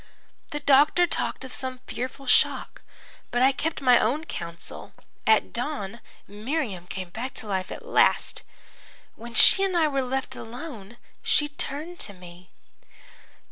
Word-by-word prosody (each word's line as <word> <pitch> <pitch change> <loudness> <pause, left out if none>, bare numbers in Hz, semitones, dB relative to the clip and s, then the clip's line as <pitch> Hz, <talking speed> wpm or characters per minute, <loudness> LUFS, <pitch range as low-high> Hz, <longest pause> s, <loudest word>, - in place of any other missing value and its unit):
"The 295 - -4
doctor 290 +5 +5
talked 325 - -2
of 255 - -8
some 260 -1 -3
fearful 260 +2 -5
shock, 250 - +3 0.5
but 245 +1 +1
I 265 - +6
kept 295 +2 -3
my 250 -2 +6
own 275 +8 +1
counsel. 170 - -7 0.3
At 220 -1 +4
dawn 235 -4 -3 0.3
Miriam 210 - -3
came 185 -1 -6
back 245 +7 -5
to - - -4
life 190 -2 -2
at 475 - -8
last. - - +3 0.7
When 230 0 -10
she 385 - +7
and 375 -2 +1
I 320 -2 +4
were 275 -2 0
left 265 +1 -3
alone, 235 -3 -9 0.2
she 295 0 +2
turned 300 +4 -5
to 205 - -4
me. 180 -1 -14
255 Hz, 145 wpm, -26 LUFS, 210-295 Hz, 0.7 s, she